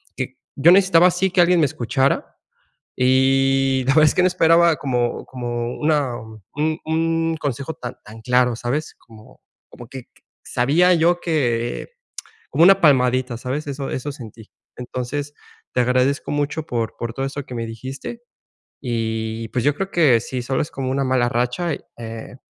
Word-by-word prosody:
que - - -5 0.2
yo 155 +5 +5
necesitaba 185 -2 +6
así 180 +2 +1
que 180 0 +3
alguien 175 0 +4
me 155 - +4
escuchara. 135 +1 -1 0.6
Y 135 +1 +3
la 135 - +3
verdad 155 0 +6
es - - +2
que 180 - +3
no 185 - +4
esperaba 170 -1 +4
como 125 -4 -2
como 120 -1 -4
una 150 -5 0 0.4
un 155 +2 -1
un 165 0 0
consejo 140 +1 -4
tan 120 0 -8
tan 110 +1 -13
claro, 125 -1 +2
¿sabes? 130 +6 -3
Como 110 -2 -18 0.3
como 120 - -12
que 130 -1 -10 0.3
sabía 165 +9 +3
yo 170 +1 +2
que 120 -8 -1 0.6
como 165 - +3
una 195 +2 +6
palmadita, 130 -4 +3
¿sabes? 130 +5 -4
Eso, 140 -1 -4
eso 145 +3 -4
sentí. 115 -5 -12 0.3
Entonces 130 +4 -5 0.4
te 125 - +2
agradezco 125 +3 +1
mucho 145 +2 -2
por 115 -6 -3
por 115 -1 -4
todo 135 +3 -3
eso 140 +1 -5
que 125 - -8
me 115 -1 -3
dijiste. 130 - -7 0.6
Y, 115 -2 -3
pues, 120 +2 -2
yo 145 - +3
creo 195 +5 -4
que 145 -11 +4
sí, 125 +2 -5
solo 130 +2 -1
es 150 - -6
como 130 -1 -4
una 135 +1 0
mala 130 -2 +1
racha, 125 +8 -1
y, - - -9 0.2
eh 115 +1 -8
135 Hz, 170 wpm, -21 LUFS, 120-155 Hz, 0.6 s, necesitaba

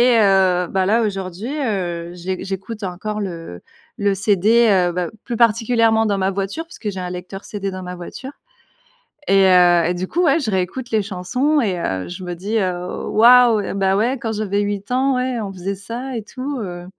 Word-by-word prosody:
et - - +5
heu, 190 -3 +3
bah, 190 -1 0
là 225 +4 +3
aujourd'hui, 195 +2 -4
heu, 175 - -2
j'é 185 +1 -4
j'écoute 195 +3 -6
encore 210 +3 -4
le 165 - -6 0.4
le 200 -1 +1
CD, 215 +4 +3
heu, 180 -3 +3
bah, 180 0 -2 0.2
plus 235 -3 -4
particulièrement 225 -1 +3
dans 200 -2 +1
ma 190 0 +1
voiture 195 - -3
puisque 325 -10 -6
j'ai 190 - -6
un 180 - -4
lecteur 180 +2 -7
CD 200 -2 -4
dans 185 0 -6
ma 180 0 -6
voiture 220 +10 -8 1.0
et 195 0 +5
heu 175 -2 +5
et 180 - 0
du 185 +1 -3
coup 345 - -1
ouais 320 0 +4
je 245 -8 -2
réécoute 190 +7 -2
les 220 - +2
chansons 220 +10 0
et 190 -6 -1
heu, 95 - -2
je 180 +1 -7
me 175 -1 -5
dis: 205 +6 -1
«Heu, 180 -2 -3
waouh 240 0 +6
et 195 - -4
bah 195 -1 +1
ouais 240 +5 0
quand 225 -1 -2
j'avais 205 -1 -1
8 205 +2 -3
ans, 265 +1 +2
ouais, 250 -1 -1
on 200 - -4
faisait 190 +1 -4
ça 240 +6 -6
et 230 - -2
tout», 265 +4 -5
heu. 175 -2 -6
200 Hz, 205 wpm, -20 LUFS, 180-230 Hz, 1.0 s, waouh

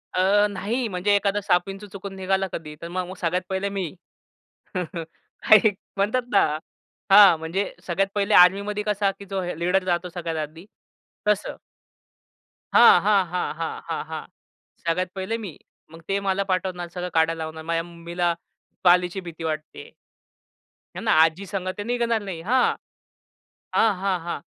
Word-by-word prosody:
अ, 200 +3 +4
नाही, 220 +6 -2
म्हणजे 205 +1 +1
एखादा 200 0 +1
साप, 180 -2 +2
विंचु 195 +2 -7
चुकून 195 0 -8
निघाला 190 0 0
कधी, 150 -2 -6
तर 170 - -6
मग 180 +1 -3
मग 185 - -8
सगळ्यात 180 +2 0
पहिले 190 +1 -1
मी. 195 -3 -3 0.9
हां, 170 +4 +1
एक 210 - +4 0.2
म्हणतात 210 +6 +1
ना 200 - +6 0.7
हां 195 -3 +9
म्हणजे 165 +5 -3
सगळ्यात 190 +2 +1
पहिले 205 +1 +1
आर्मीमध्ये 200 +3 +5
कसा 205 -1 +1
की 200 - -10
जो 195 -1 -1
हे 180 -3 -4
लीडर 180 +2 +1
जातो 180 -1 -1
सगळ्यात 165 -3 -3
आधी, 165 +5 -14 0.6
तसं. 210 -1 0 1.2
हां, - - +8
हां, 205 -2 +5
हां, 180 0 -2 0.4
हां, 165 - -2
हां. 160 -1 -4 0.6
सगळ्यात 175 +2 0
पहिले 190 +4 -2
मी. 195 - -5 0.4
मग 165 0 -12
ते 195 0 +1
मला 195 +1 +1
पाठवणार. 185 -1 -2
सगळं 180 0 -3
काढायला 165 +1 +3
लावणार. 160 0 -7
माझ्या 165 0 -1
मम्मीला 170 0 -2 0.5
पालीची 180 +1 +4
भीती 165 0 -8
वाटते. 155 -1 -5 1.0
आहे - - -6
ना, - - +2
आजी 160 +4 +4
संग 195 -2 -4
ते 205 - -3
न - - -10
निघणार 235 -2 0
नाही. 185 -5 -6
हां, 245 +8 +2 1.0
हां, 220 -2 +4
हां, 195 -2 0
हां. 170 -2 -5
185 Hz, 160 wpm, -24 LUFS, 170-200 Hz, 1.2 s, हां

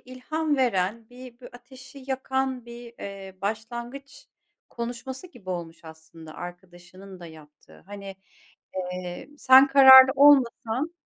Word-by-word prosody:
ilham 290 +4 -4
veren, 220 -2 -1
bir 250 0 -14
bu - - -12
ateşi 260 +2 -15
yakan 265 -1 -3
bir, 235 0 -12
eee, 195 -1 -10
başlangıç 235 +6 -7 0.4
konuşması 245 +6 -7
gibi 220 - -12
olmuş 170 -2 -7
aslında 160 0 -14
arkadaşının 180 +1 -12
da 170 - -10
yaptığı. 150 - -18
Hani, 200 -1 -10 0.6
eee, 180 +3 -7
sen 265 +1 +6
kararlı 265 -1 +8
olmasan 275 +1 +2
235 Hz, 115 wpm, -24 LUFS, 185-265 Hz, 0.6 s, kararlı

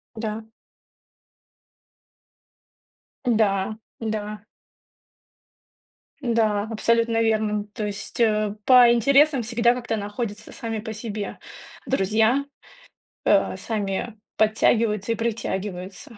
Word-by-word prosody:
Да. 220 0 -5 2.8
Да, 215 -3 +1 0.2
да. 215 -1 -4 1.8
Да, 225 -5 +1
абсолютно 230 +1 +1
верным, 215 -2 0
то 210 0 -5
есть, 205 +3 -6
э, 215 -2 +2
по 250 -2 +8
интересам 275 +4 +4
всегда 235 +1 +2
как-то 240 -2 -3
находятся 210 +1 -5
сами 225 -2 -4
по 220 +1 -6
себе 215 -2 -5 0.5
друзья, 220 +3 +2 0.8
э, - - +3
сами 210 0 -3 0.2
подтягиваются 215 0 +2
и - - +1
притягиваются. 205 -2 -4
220 Hz, 85 wpm, -24 LUFS, 210-235 Hz, 2.8 s, по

